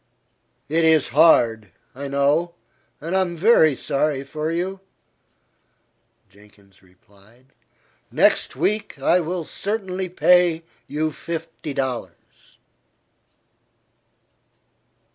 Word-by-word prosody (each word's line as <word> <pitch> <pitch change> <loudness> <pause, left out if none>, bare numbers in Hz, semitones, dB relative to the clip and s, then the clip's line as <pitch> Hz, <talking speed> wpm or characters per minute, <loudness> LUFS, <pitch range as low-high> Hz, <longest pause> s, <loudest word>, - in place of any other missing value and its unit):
"It 165 +3 +1
is 160 -3 +3
hard, 115 - +3 0.2
I 140 +2 -7
know, 145 +5 0 0.4
and 165 +5 -4
I 190 - +3
am 175 -2 -3
very 160 - +4
sorry 140 +1 -1
for 150 +3 -4
you," 185 +3 -3 1.5
Jenkins 100 -1 -23
replied. 100 +7 -25 0.6
"Next - - +2
week, 205 +8 -2
I 180 - +3
will 175 0 -4
certainly 190 -2 -4
pay 180 -2 +3 0.2
you 155 +2 -2
fifty 160 -1 -7
dollars." 125 -10 -6
155 Hz, 90 wpm, -22 LUFS, 130-175 Hz, 1.5 s, very